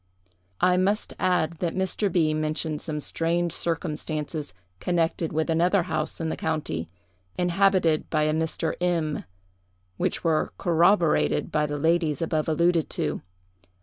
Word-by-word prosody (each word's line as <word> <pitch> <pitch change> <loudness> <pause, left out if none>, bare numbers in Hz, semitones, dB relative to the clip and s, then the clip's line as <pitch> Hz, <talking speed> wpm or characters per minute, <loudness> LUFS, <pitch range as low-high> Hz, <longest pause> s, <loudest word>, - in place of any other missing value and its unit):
"I 180 0 +4
must 200 +3 +1
add, 170 -3 +1
that 170 -2 -2
Mr. 190 +2 0
B—— 160 -3 +2
mentioned 155 0 -2
some 150 -2 -2
strange 170 +3 0
circumstances 155 -2 -3 0.3
connected 170 -2 0
with 160 +1 0
another 175 +3 +3
house 160 -3 -2
in 165 -1 -2
the - - -2
county, 150 - -3 0.5
inhabited 180 -3 +2
by 155 -1 +1
a 155 0 +1
Mr. 160 0 -1
M——, 165 -4 0 0.7
which - - -1
were 160 -2 +1
corroborated 170 0 +3
by 150 -1 +1
the 145 0 -3
ladies 160 -1 +1
above 160 -1 -1
alluded 170 +1 +2
to. - - -2
165 Hz, 135 wpm, -26 LUFS, 155-175 Hz, 0.7 s, I